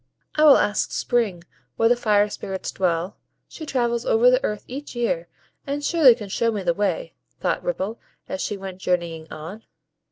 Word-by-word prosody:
"I 305 - +2
will 290 - +9
ask 205 0 0
Spring 215 -8 0 0.3
where 225 - +3
the 245 - +4
Fire 210 -3 +3
Spirits 190 -2 -5
dwell; 180 0 -1 0.3
she 315 - -9
travels 240 -3 0
over 240 +2 +4
the 255 +1 +2
earth 210 -1 -2
each 275 +1 -8
year, 240 - -1 0.4
and 290 +1 -2
surely 300 -9 +6
can 215 -4 -8
show 230 +4 +1
me 205 -3 -3
the 175 -1 +2
way," 205 - -1 0.3
thought - - -1
Ripple, 230 - -3 0.3
as 190 - -4
she 205 - -2
went 190 -1 -8
journeying 170 -3 -2
on. 165 +8 -8
215 Hz, 180 wpm, -23 LUFS, 190-250 Hz, 0.4 s, will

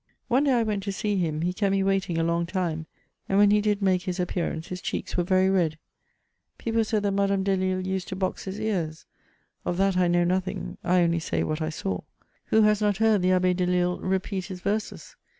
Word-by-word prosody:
One 265 +4 +3
day 275 - +3
I 235 -2 +3
went 210 -2 -1
to 200 - -1
see 205 +1 -1
him, 160 -4 -1
he 180 +1 0
kept 200 +1 0
me 195 0 +2
waiting 195 -3 0
a 165 - +1
long 170 +1 0
time, 170 -3 -2 0.4
and 195 - +2
when 205 0 +6
he 210 0 +4
did 205 -1 0
make 185 -2 +3
his 180 0 -4
appearance, 175 -2 -2
his 180 0 -5
cheeks - - -4
were 175 - +2
very 185 +1 +3
red: 175 -5 +1 0.8
people 230 -1 0
said 215 -1 -1
that 200 - +1
Madame 195 0 +1
Dehlle 185 -1 0
used 190 -1 -2
to 190 - -4
box 185 -1 -3
his 195 +2 -5
ears: 180 -8 -2 0.6
of 175 - -2
that 195 -1 +2
I 180 -1 +3
know 175 0 +3
nothing; 185 +1 -2
I 180 +1 +3
only 170 0 +1
say 160 - -1
what 155 +1 -2
I 155 - -1
saw. 95 - -3 0.5
Who 220 - +4
has 210 0 +3
not 205 -2 +2
heard 220 -2 +3
the 185 +1 +3
Abbe 185 0 +3
Delille 180 0 +1
repeat 190 0 -1
his 185 -2 -8
verses? 210 +3 -3
185 Hz, 220 wpm, -26 LUFS, 175-200 Hz, 0.8 s, when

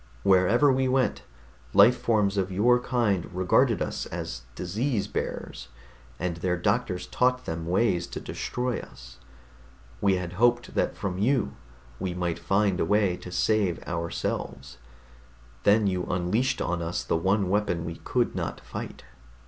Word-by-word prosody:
Wherever 100 +9 +4
we 130 0 +1
went, 125 - +1 0.5
life 125 - +8
forms 105 -5 +1
of 95 -1 -1
your 120 +6 +4
kind 115 -8 0
regarded 90 0 +2
us - - -4
as 60 - -5
disease 105 - -1
bearers, - - -5 0.5
and 85 -1 -2
their 90 +1 0
doctors 100 0 0
taught 125 0 +1
them 80 0 -4
ways 90 -1 +1
to - - -6
destroy 125 0 -3
us. - - -13 0.8
We 100 -2 +3
had 90 -1 -4
hoped 120 +4 +2
that - - 0
from 95 -2 -3
you 120 +3 +1 0.4
we 90 -2 -3
might 85 -2 -2
find 95 -2 +1
a - - +2
way 100 -3 +2
to 90 - -10
save 100 -3 +1
ourselves 85 -6 -4 0.9
then 105 +1 +5
you 90 -2 0
unleashed 105 +9 0
on 90 -1 -2
us 85 +1 -2
the - - 0
one 95 +4 +1
weapon 95 -4 0
we 80 0 -5
could - - 0
not - - -3
fight." - - -7
95 Hz, 150 wpm, -27 LUFS, 90-115 Hz, 0.9 s, life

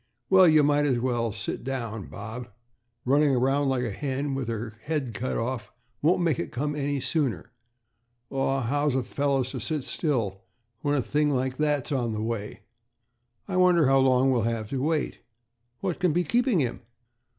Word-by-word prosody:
"Well, 190 -1 +8
you 155 -2 +6
might 145 0 +3
as 130 -3 +2
well 120 -2 0
sit 100 +2 -5
down, 115 -6 -4
Bob. 110 +4 -7 0.6
Running 140 +1 +4
around 135 +3 +2
like 130 -2 0
a 120 - -2
hen 140 +4 -2
with 135 -3 -3
her 115 -1 -4
head 145 -6 -2
cut 125 +5 -2
off 115 -2 -3 0.3
won't 175 +4 +3
make 165 -6 +1
it 85 - -4
come 150 +4 -2
any 145 -1 -1
sooner." 130 - -1 0.8
"Aw, 135 0 0
how's 145 +3 0
a 130 - +1
fellow 140 +1 0
to 130 - -5
sit 155 -4 -2
still 115 - -1 0.4
when 145 +2 0
a 135 - +1
thing 150 +3 +1
like 130 -1 -1
that's 150 -3 0
on 120 -5 0
the 105 0 -3
way? 105 -3 -4 0.9
I 190 -2 -2
wonder 180 -3 +5
how 135 +1 +5
long 130 0 +4
we'll 125 -3 +2
have 115 -1 -2
to 135 -2 -1
wait. 155 +1 -1 0.6
What 185 -4 -2
can 180 -4 +2
be 175 +2 +2
keeping 240 - +2
him?" 120 -3 -2
135 Hz, 180 wpm, -26 LUFS, 120-150 Hz, 0.9 s, Well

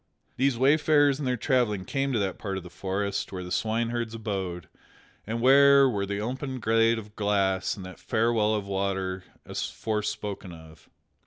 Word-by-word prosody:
These 135 -2 +1
wayfarers 145 +1 +4
in 145 - -3
their 125 -1 0
travelling 115 -7 +1
came 135 -1 -1
to 120 - +1
that 95 -3 -2
part 95 -2 -3
of 95 - -6
the 90 - -11
forest 100 +2 -3
where 90 -1 -5
the 90 - -8
swineherds 115 +3 -1
abode, 95 -5 -4 0.6
and 115 +1 -2
where 140 +1 +7
were 100 -5 -1
the 100 0 -2
open 130 +4 -4
glade 115 +1 +3
of 105 -1 -9
grass 100 -2 0
and 95 - -8
the 95 - -9
fair 115 +2 0
well 110 -1 +2
of 105 -2 -3
water 95 -1 -2 0.2
aforespoken 105 -3 -4
of. 80 -1 -15
105 Hz, 170 wpm, -27 LUFS, 95-125 Hz, 0.6 s, where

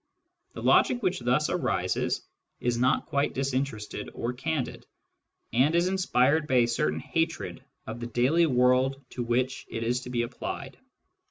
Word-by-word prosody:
The - - -7
logic 245 -2 +4
which 185 -1 +1
thus 125 +5 +1
arises - - 0 0.4
is 120 -1 0
not 125 +1 +2
quite 145 -2 0
disinterested 130 -5 -2
or 120 +1 -2
candid, 140 +1 -3 0.7
and 135 +7 +3
is 170 +1 +3
inspired 160 -5 +2
by 130 - +1
a - - +1
certain 80 -9 0
hatred 165 - -2 0.2
of 110 +2 -6
the 120 - -4
daily 135 +8 +3
world 130 +1 +3
to 125 - -4
which 125 +2 -1
it 115 - -4
is 120 +2 0
to 125 - -8
be 120 -1 0
applied. 130 +2 -6
130 Hz, 155 wpm, -28 LUFS, 120-150 Hz, 0.7 s, logic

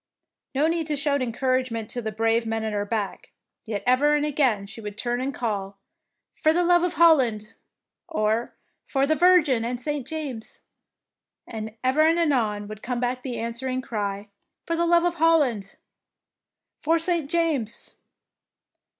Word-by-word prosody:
No 285 +3 +3
need 330 -1 -1
to 300 - -1
shout 285 -1 0
encouragement 255 -2 -1
to 245 - -3
the 220 -1 -3
brave 225 +2 +1
men 225 0 -2
at 220 -1 -2
her 205 0 -1
back, 210 -3 -3 0.4
yet 215 -3 -4
ever 280 +4 +4
and 295 0 +1
again 260 -9 +1
she 200 +3 -10
would 210 -1 -7
turn 245 +1 -1
and 270 +2 -1
call, 200 -6 -3 0.7
^'Por 315 +1 +4
love 350 -1 +5
of 360 0 0
Holland,^' 255 -11 +3 0.5
or 225 -7 0 0.4
''For 275 0 +1
the 315 - +3
Virgin 315 -8 +4
and 240 +1 -3
St. 290 0 -3
James,'' 275 -8 -6 0.8
and 220 0 -7
ever 260 +4 +3
and 325 +2 +4
anon 230 -11 +1
would 215 0 -9
come 250 -1 -3
back 250 +1 -1
the 250 -2 -5
answering 255 +3 -3
cry, 205 -3 -4 0.4
"For 335 - -1
love 340 0 +3
of 350 -1 +1
Holland," 270 - +2 1.1
"For 325 +2 +2
St. 330 -3 -1
James." 300 -10 -1
255 Hz, 155 wpm, -25 LUFS, 220-310 Hz, 1.1 s, love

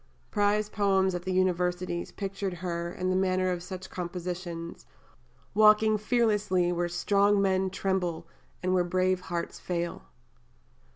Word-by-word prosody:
Prize 205 0 +2
poems 195 -3 +2
at 180 0 -4
the 185 - -1
universities 180 -1 0
pictured 195 -2 -4
her, 170 -1 -3
in 185 +1 -2
the - - +1
manner 185 -1 +1
of 175 -1 -3
such 185 +1 -8
compositions, 175 -1 -5 0.7
walking 215 +1 +6
fearlessly 210 -5 +1
Where 175 0 -1
strong 200 +3 +2
men 190 -1 +2
tremble 180 -4 -2 0.4
and 185 0 +1
where 180 -1 +3
brave 185 +1 +1
hearts 170 -2 -4
fail. 175 -1 -3
185 Hz, 130 wpm, -28 LUFS, 175-195 Hz, 0.7 s, walking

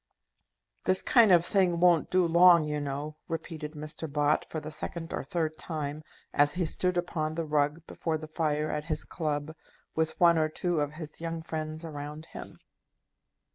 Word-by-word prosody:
"This 185 0 +2
kind 230 -5 +6
of 175 -1 +6
thing 180 -4 +2
won't 175 -3 +4
do 185 -1 +3
long, 170 0 +7
you 150 0 -2
know," 145 +2 -4
repeated 160 -2 -5
Mr. 155 0 -6
Bott 150 0 +2
for 160 - -3
the 155 0 -7
second 165 +2 -6
or - - -2
third 155 +2 -2
time, 150 -2 -4 0.3
as 145 +2 +3
he 180 -1 0
stood 180 +3 0
upon 160 -3 -1
the 165 0 -2
rug 150 +2 0
before 160 -2 -2
the 155 0 -8
fire 155 -1 -1
at 150 0 -3
his 155 -2 -3
club, 155 -2 -3 0.4
with 160 0 -1
one 170 -2 +6
or 155 0 +2
two 175 +1 -1
of 145 0 -1
his 155 0 -9
young 165 -1 -4
friends 155 0 -5
around 150 0 -7
him. - - -10
155 Hz, 175 wpm, -29 LUFS, 150-170 Hz, 0.4 s, long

